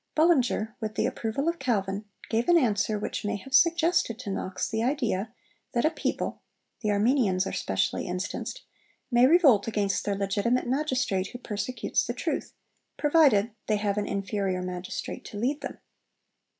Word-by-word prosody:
Bullinger, 265 -9 +3
with 215 -2 -4
the - - +1
approval 230 +7 -2
of 335 0 0
Calvin, 200 -3 -1 0.2
gave 230 +5 0
an 345 - +7
answer 210 -6 +1
which 205 - -4
may 205 - -1
have 265 +7 -9
suggested 335 -6 +3
to 220 -5 -5
Knox 190 -1 -3
the 220 - -2
idea 235 -5 0 0.4
that 240 - +1
a 310 - +3
people - - -3 0.4
(the 215 - -1
Armenians 205 -3 +2
are - - -3
specially - - -1
instanced) 185 - -4 0.5
may 240 +1 +6
revolt 275 - +5
against 205 -3 0
'their 200 - -1
legitimate 200 +5 0
magistrate' 255 -8 0
who 245 - -8
persecutes 225 +1 -2
the - - -3
truth, - - -3 0.4
provided 290 -9 +4 0.2
they 215 - +2
have 205 0 0
an 205 - -2
inferior 195 -2 -1
magistrate 180 0 -5
to 205 - -8
lead 265 +7 -1
them. - - -6
220 Hz, 160 wpm, -27 LUFS, 200-260 Hz, 0.5 s, an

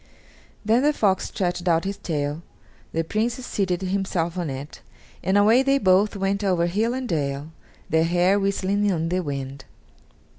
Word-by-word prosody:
Then 225 +3 +4
the 295 +2 +3
fox 195 -8 +1
stretched 180 -1 -2
out 165 -1 +3
his 195 +1 -3
tail, 150 -4 -3 0.5
the 165 - 0
Prince 220 +7 -1
seated 190 -5 -1
himself 185 -3 -1
on 175 -4 -2
it, 135 +2 -7 0.4
and 190 +2 +2
away 220 +5 +5
they 275 +1 +3
both 195 -2 +3
went 200 +1 -1
over 180 -3 +2
hill 215 +7 0
and 260 -1 -3
dale, 145 -3 -2 0.4
their 160 0 +2
hair 180 +4 +3
whistling 200 +1 0
in 165 -4 0
the 180 +1 0
wind. 140 -4 -5
185 Hz, 160 wpm, -24 LUFS, 165-205 Hz, 0.5 s, away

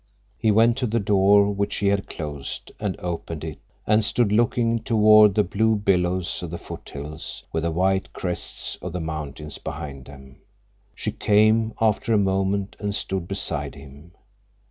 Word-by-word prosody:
He 110 -1 +2
went 115 +3 +4
to 125 - 0
the 115 +2 0
door 100 0 +4
which 100 0 -2
she 100 - +1
had 100 0 0
closed, 75 -4 -6
and 105 -3 -3
opened 85 -2 -4
it, 80 -2 -6 0.3
and 110 +1 +3
stood 110 0 +1
looking 115 +1 +2
toward 110 -3 +6
the 105 - +4
blue 110 +4 +1
billows 90 -3 0
of 90 - -5
the 85 - -5
foothills 75 -2 -8
with 80 - 0
the 85 - 0
white 95 +3 0
crests 90 -1 -4
of - - -6
the 90 - -2
mountains 75 -2 -6
behind 75 -4 -7
them. 65 -2 -14 0.6
She - - -3
came, 110 +2 +3
after 110 +1 +2
a - - +5
moment, 95 0 0
and 105 -1 -2
stood 95 -4 -2
beside 95 +1 -3
him. 70 +4 -14
95 Hz, 165 wpm, -24 LUFS, 80-105 Hz, 0.6 s, toward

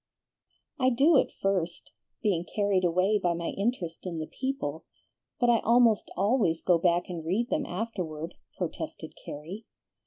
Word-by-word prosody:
"I 255 -1 +4
do 280 +5 +5
at - - +1
first, 185 -3 -2 0.3
being 190 -6 +2
carried 200 -1 0
away 185 +4 +3
by 175 -2 +1
my 170 0 -3
interest 195 -6 -2
in 170 -2 -4
the 155 - -3
people, 260 - -3 0.6
but 245 - +3
I 230 - +4
almost 235 -2 +4
always 200 -4 +2
go 175 -2 +4
back 175 0 +2
and 170 -3 -5
read 210 +10 -1
them - - 0
afterward," 175 -6 -4 0.2
protested - - -5
Carrie. 170 +9 -8
185 Hz, 150 wpm, -28 LUFS, 170-230 Hz, 0.6 s, do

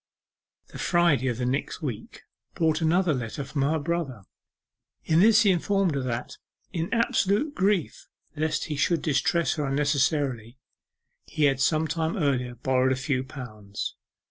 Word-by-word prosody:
The - - -10
Friday 170 -7 +2
of 120 -3 -1
the 125 - -2
next 135 +6 -2
week 125 -8 -6 0.3
brought 160 -1 +1
another 170 +1 +2
letter 125 +2 -4
from 135 +1 -3
her 150 +4 +2
brother. 145 -8 -3 0.8
In 160 +1 +3
this 215 +3 +6
he 200 - +5
informed 190 0 +1
her 140 - -1
that, 120 -1 -4 0.4
in 165 -1 -3
absolute 230 +4 +1
grief 195 - 0 0.3
lest 155 +1 -1
he 150 - -4
should 150 +3 +1
distress 160 +3 +1
her 150 - -1
unnecessarily, 135 -4 0 0.7
he 155 - -2
had 135 -2 +3
some 155 +3 +2
time 160 +1 -2
earlier 130 -6 0
borrowed 130 +1 +1
a - - +2
few 130 -1 -1
pounds. 110 -7 -7
145 Hz, 150 wpm, -26 LUFS, 130-170 Hz, 0.8 s, this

